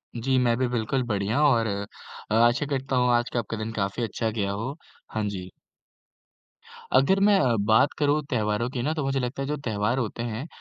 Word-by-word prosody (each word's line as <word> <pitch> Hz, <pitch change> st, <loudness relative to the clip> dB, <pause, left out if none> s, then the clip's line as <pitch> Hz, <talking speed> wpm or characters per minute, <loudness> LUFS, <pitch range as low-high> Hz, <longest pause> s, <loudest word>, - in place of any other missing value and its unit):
जी 130 Hz, +3 st, +1 dB
मैं 120 Hz, -2 st, +3 dB
भी 130 Hz, -, +1 dB
बिल्कुल 125 Hz, +2 st, -1 dB
बढ़िया 105 Hz, +5 st, 0 dB
और 115 Hz, -4 st, +3 dB
अ, 100 Hz, +1 st, -7 dB
आशा 120 Hz, +5 st, +4 dB
करता 135 Hz, -1 st, -2 dB
हूँ, 125 Hz, -1 st, +3 dB
आज 120 Hz, +1 st, 0 dB
का 120 Hz, -, +2 dB, 0.2 s
दिन 110 Hz, +1 st, -4 dB
काफ़ी 100 Hz, +2 st, -2 dB
अच्छा 115 Hz, +1 st, -2 dB
गया 100 Hz, -3 st, -2 dB
हो। 115 Hz, +8 st, -4 dB, 0.4 s
हाँ, 110 Hz, -, -2 dB
जी। 95 Hz, -2 st, -6 dB, 1.5 s
अगर 165 Hz, +9 st, +4 dB
मैं 200 Hz, 0 st, +5 dB
अ, 125 Hz, -4 st, +2 dB
बात 110 Hz, +8 st, +4 dB
करूँ 145 Hz, +1 st, +2 dB
त्योहारों 110 Hz, -1 st, 0 dB
की 125 Hz, -2 st, -4 dB
ना, 155 Hz, -, 0 dB
तो 155 Hz, -3 st, -2 dB
मुझे 135 Hz, 0 st, 0 dB
लगता 125 Hz, +2 st, -3 dB
है 135 Hz, -, -2 dB
जो 150 Hz, +1 st, -2 dB
त्योहार 110 Hz, -2 st, -1 dB
होते 115 Hz, -2 st, -3 dB
हैं, 120 Hz, +5 st, -4 dB
120 Hz, 200 wpm, -26 LUFS, 110-135 Hz, 1.5 s, मैं